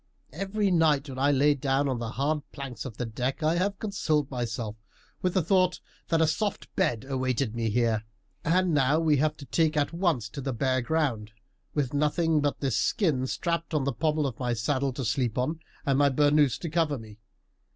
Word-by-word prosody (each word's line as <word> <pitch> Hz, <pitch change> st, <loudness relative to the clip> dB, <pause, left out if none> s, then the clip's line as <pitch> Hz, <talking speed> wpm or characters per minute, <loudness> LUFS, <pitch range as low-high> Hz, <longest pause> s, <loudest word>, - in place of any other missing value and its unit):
Every 195 Hz, +4 st, -1 dB
night 155 Hz, -4 st, +3 dB
when 130 Hz, -1 st, -6 dB
I 140 Hz, +2 st, +3 dB
lay 145 Hz, +2 st, +4 dB
down 140 Hz, 0 st, 0 dB
on 130 Hz, -3 st, -1 dB
the 115 Hz, 0 st, -4 dB
hard 150 Hz, +3 st, 0 dB
planks 140 Hz, -4 st, -7 dB
of 120 Hz, -4 st, -7 dB
the 125 Hz, -, -2 dB
deck 125 Hz, +7 st, -3 dB
I 155 Hz, +1 st, +3 dB
have 200 Hz, +2 st, 0 dB
consoled 155 Hz, -9 st, -1 dB
myself 115 Hz, -3 st, -3 dB, 0.5 s
with 180 Hz, -1 st, 0 dB
the 185 Hz, -, +3 dB
thought 185 Hz, 0 st, +2 dB, 0.3 s
that 165 Hz, -1 st, +2 dB
a -, -, +5 dB
soft 200 Hz, +6 st, -2 dB
bed 115 Hz, -1 st, 0 dB
awaited 130 Hz, -3 st, -1 dB
me 115 Hz, -1 st, -1 dB
here; 115 Hz, -1 st, +1 dB, 0.4 s
and 180 Hz, +1 st, +2 dB
now 145 Hz, +1 st, +3 dB
we 155 Hz, -3 st, +3 dB
have 155 Hz, +2 st, +1 dB
to 140 Hz, -, -10 dB
take 155 Hz, +4 st, +1 dB
at 145 Hz, +2 st, +1 dB
once 165 Hz, -, 0 dB
to 140 Hz, -, -7 dB
the 135 Hz, 0 st, -2 dB
bare 130 Hz, +2 st, +1 dB
ground, 120 Hz, -7 st, -1 dB, 0.4 s
with 145 Hz, -3 st, 0 dB
nothing 150 Hz, +2 st, +2 dB
but 145 Hz, -1 st, -1 dB
this 135 Hz, -4 st, 0 dB
skin 145 Hz, -10 st, +1 dB
strapped 170 Hz, +2 st, -2 dB
on 145 Hz, -, +2 dB
the 140 Hz, -1 st, -1 dB
pommel 150 Hz, +3 st, 0 dB
of 130 Hz, -5 st, -4 dB
my 125 Hz, -2 st, 0 dB
saddle 130 Hz, +4 st, 0 dB
to 130 Hz, 0 st, -4 dB
sleep 120 Hz, +1 st, 0 dB
on, 150 Hz, +6 st, -1 dB, 0.3 s
and 135 Hz, -1 st, +2 dB
my 145 Hz, -1 st, +5 dB
bernous 145 Hz, -1 st, +3 dB
to 170 Hz, -, -3 dB
cover 160 Hz, -3 st, +1 dB
me. 110 Hz, -2 st, -12 dB
145 Hz, 205 wpm, -27 LUFS, 125-160 Hz, 0.5 s, a